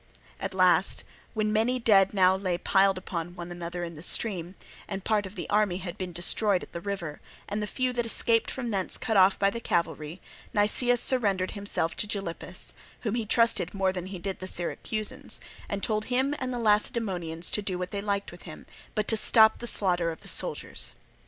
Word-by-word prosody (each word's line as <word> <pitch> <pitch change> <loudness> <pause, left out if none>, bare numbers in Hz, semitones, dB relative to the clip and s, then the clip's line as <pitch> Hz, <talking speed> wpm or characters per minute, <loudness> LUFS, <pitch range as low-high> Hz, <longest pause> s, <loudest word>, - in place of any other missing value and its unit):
At - - -4
last, - - +6 0.3
when 215 -1 0
many 230 +4 +1
dead 200 -5 +4
now 190 -2 +4
lay 185 -2 -2
piled 195 +1 +2
one 175 -3 -5
upon 175 -1 -8
another 175 0 -5
in 170 0 -6
the 155 - -11
stream, 180 -1 +1 0.3
and 195 -2 -5
part 210 -3 0
of 190 - -13
the 180 - -5
army 205 -3 +1
had 180 -2 -7
been 185 -1 -5
destroyed 180 +3 +2
at - - -13
the 170 - -5
river, 175 -7 -5 0.3
and 205 +1 -3
the 210 - -3
few 255 +3 -1
that 240 -1 -2
escaped 230 0 +2
from 245 -3 -4
thence 190 -3 +2
cut 220 - -2
off 190 0 +5
by 200 0 +2
the 235 - -5
cavalry, 170 -4 -2 0.4
Nicias 240 +4 +2
surrendered 200 -8 +1
himself 200 -5 -2
to 210 - +1
Gylippus, 195 -5 -3 0.3
whom 215 -3 -2
he 230 -2 -2
trusted 230 -1 +2
more 190 -1 +1
than 180 -1 -5
he 190 0 -7
did 190 +2 -5
the 185 - -5
Syracusans, 215 +9 -1 0.3
and 200 -1 -4
told 215 -1 -1
him 260 +3 0
and 255 -1 -3
the 245 - -3
Lacedaemonians 205 -6 0
to 210 - -1
do 190 -3 -3
what 180 0 -5
they 200 - -3
liked 200 -1 -2
with 175 - -13
him, 155 - -11 0.3
but 215 -1 -1
to 225 - +2
stop 220 0 +5
the 240 - -4
slaughter 180 -6 +3
of 160 - -10
the - - -10
soldiers. - - -1
200 Hz, 205 wpm, -27 LUFS, 180-220 Hz, 0.4 s, last